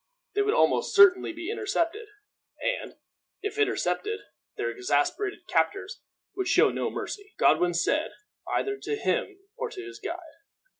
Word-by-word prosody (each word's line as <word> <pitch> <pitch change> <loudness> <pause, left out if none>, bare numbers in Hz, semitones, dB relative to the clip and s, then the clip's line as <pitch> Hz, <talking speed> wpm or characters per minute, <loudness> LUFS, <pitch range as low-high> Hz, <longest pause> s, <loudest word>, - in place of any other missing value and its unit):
They 410 - +2
would 415 +3 +2
almost - - +2
certainly 385 -3 +7
be 345 +4 -5
intercepted; 425 -1 -1 0.5
and, - - -2 0.5
if 415 +1 -3
intercepted, 425 +1 0 0.4
their - - -1
exasperated 390 +1 0
captors 485 - 0 0.3
would 385 -1 -1
show - - +5
no - - -1
mercy, 410 +1 -6
Godwin 175 -1 +4
said, 290 - +1 0.4
either 405 0 0
to 435 - -3
him 425 -2 -1 0.2
or 485 -1 -3
to 375 -4 -8
his 380 +1 -9
guide. 375 -4 -4
405 Hz, 140 wpm, -27 LUFS, 370-430 Hz, 0.5 s, certainly